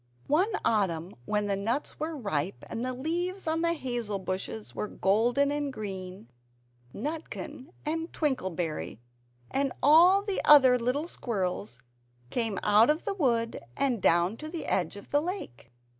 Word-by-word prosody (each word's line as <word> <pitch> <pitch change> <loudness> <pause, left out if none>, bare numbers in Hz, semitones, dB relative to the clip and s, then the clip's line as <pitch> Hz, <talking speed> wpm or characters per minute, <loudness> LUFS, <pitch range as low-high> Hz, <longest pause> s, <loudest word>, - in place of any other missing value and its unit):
One 360 +10 +2
autumn 185 -5 +1
when 210 -1 0
the 200 -1 0
nuts 225 +9 -2
were 310 +1 -3
ripe, 195 - -2
and 230 - -3
the 255 - -1
leaves 350 +8 -2
on 320 0 0
the 335 0 +2
hazel 240 -9 -2
bushes 180 - -4
were 210 - -3
golden 240 +9 +2
and 290 -1 -2
green 190 - -7 0.6
Nutkin 295 - -6 0.2
and 325 +2 -2
Twinkleberry 185 - -2 0.5
and 275 -1 0
all 350 +7 +7
the 405 -2 -1
other 260 -4 +7
little 255 +7 0
squirrels 180 - -3 0.5
came 225 -5 0
out 210 +4 +5
of 305 +2 +1
the 405 - -1
wood, 235 -10 0 0.2
and 255 -6 +1
down 175 +6 +3
to 310 +4 -7
the 330 -1 -5
edge 185 0 0
of 200 - -11
the 290 - +3
lake. 320 - -6
245 Hz, 150 wpm, -29 LUFS, 195-305 Hz, 0.6 s, all